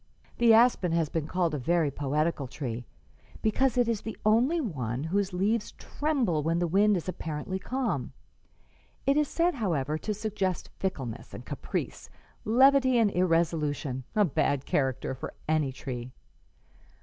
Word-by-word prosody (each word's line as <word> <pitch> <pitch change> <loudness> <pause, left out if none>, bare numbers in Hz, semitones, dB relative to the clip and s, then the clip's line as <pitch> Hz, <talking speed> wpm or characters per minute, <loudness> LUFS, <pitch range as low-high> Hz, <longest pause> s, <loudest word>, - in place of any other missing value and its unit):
"The 235 -1 +6
aspen 225 -6 +5
has 165 -3 +1
been 160 -2 -2
called 175 -3 0
a 150 - -1
very 160 +1 +1
poetical 145 +1 -1
tree, 120 -3 -5 0.6
because 250 +3 +2
it 245 -1 +3
is 230 -3 0
the 220 - -6
only 240 +10 +3
one 135 - -3
whose 195 +4 0
leaves 205 +5 0
tremble 260 - -1
when 165 +3 0
the 175 - +1
wind 200 +4 +3
is 175 - -6
apparently 165 +1 -4
calm. 255 +4 -2 0.9
It 275 - +3
is 300 -1 +2
said, 345 +4 +1
however, 155 - -1
to 215 - -2
suggest 200 -4 -2
fickleness 135 -12 -4
and - - -9
caprice, - - -4 0.4
levity 260 +2 +5
and 220 -3 +3
irresolution 160 -7 0
a 210 -1 +5
bad 140 -3 0
character 130 -2 0
for 130 - -7
any 155 -3 +1
tree. 125 -3 -6
180 Hz, 150 wpm, -28 LUFS, 150-225 Hz, 0.9 s, The